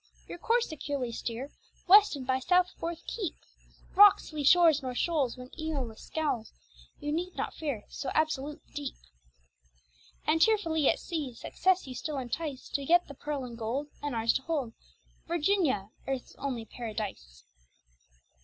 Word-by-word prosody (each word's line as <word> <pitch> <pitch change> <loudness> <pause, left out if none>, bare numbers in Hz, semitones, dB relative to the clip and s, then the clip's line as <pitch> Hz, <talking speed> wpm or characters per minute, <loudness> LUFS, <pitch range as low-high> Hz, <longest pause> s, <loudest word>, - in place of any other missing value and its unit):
Your 345 - -8
course 470 +5 +2
securely 280 -5 -3
steer, 240 +4 -4 0.4
West 405 -1 +8
and 265 -2 -6
by 260 0 +1
south 360 +6 +3
forth 335 0 -4
keep! 385 -8 -3 0.6
Rocks, 405 -4 +7
lee 300 -1 -2
shores, 320 0 +6
nor 255 -2 -4
shoals, 280 -5 0
When 250 0 -10
Eolus 275 -8 -3
scowls, 290 -9 -2 0.5
You 295 -1 -3
need 355 +4 -2
not - - -3
fear, 280 -10 -3
So - - -5
absolute 300 -1 0
the - - -28
deep. 285 -2 -4 1.3
And 320 +1 +2
cheerfully 330 -8 +3
at - - +2
sea, 295 -8 -4
Success 370 +9 +1
you 260 - -7
still 295 +3 -4
entice, 265 +2 -4
To 280 - -2
get 345 +5 +4
the 285 - -8
pearl 285 -1 -4
and 240 -2 -8
gold, 240 +6 -3
And 290 -3 -3
ours 225 0 +2
to - - 0
hold 275 -7 -2 0.5
Virginia, 325 - +1 0.2
Earth's 270 -2 -3
only 255 -5 -3
paradise. 210 - -6
290 Hz, 155 wpm, -30 LUFS, 250-330 Hz, 1.3 s, West